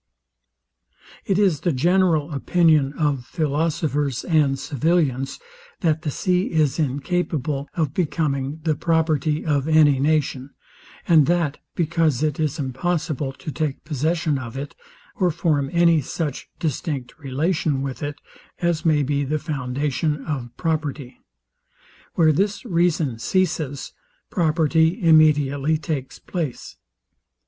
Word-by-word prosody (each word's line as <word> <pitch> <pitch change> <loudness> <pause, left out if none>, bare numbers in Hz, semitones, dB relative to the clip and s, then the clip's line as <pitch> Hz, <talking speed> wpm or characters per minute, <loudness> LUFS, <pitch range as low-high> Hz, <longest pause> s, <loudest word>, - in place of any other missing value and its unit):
It 195 - +2
is 190 -8 +3
the 175 - 0
general 165 +1 +2
opinion 150 -1 +3
of 145 -5 0
philosophers 150 -3 -1
and 150 -5 +2
civilians, 145 -2 0 0.4
that 160 -4 +1
the 155 - -2
sea 180 +5 0
is 155 -2 +1
incapable 145 -1 -1
of 155 -5 -1
becoming 150 -3 -1
the 160 -2 +2
property 155 -1 0
of 145 -2 +1
any 155 -4 +5
nation; 140 -2 0 0.5
and 160 -5 +5
that 170 -4 +1 0.2
because 160 -4 +1
it 155 +2 0
is 155 0 0
impossible 150 0 -2
to 150 - -7
take 150 -2 -3
possession 155 0 0
of 120 0 -7
it, 140 +1 -5 0.4
or 180 - +2
form 150 -4 0
any 170 -2 +4
such 145 +1 -4
distinct 150 -4 -3
relation 150 +1 -1
with 135 -2 -5
it, 145 0 -3 0.4
as 170 -2 0
may 155 -3 +3
be 140 +1 0
the 150 +3 -1
foundation 145 0 -2
of 135 -6 -3
property. 150 -6 -3 0.9
Where 160 -2 +5
this 200 - 0
reason 165 - +1
ceases, 155 -4 -1 0.4
property 160 - +2
immediately 155 -3 +4
takes 150 -4 -4
place. 160 -9 -5
155 Hz, 120 wpm, -22 LUFS, 140-165 Hz, 0.9 s, any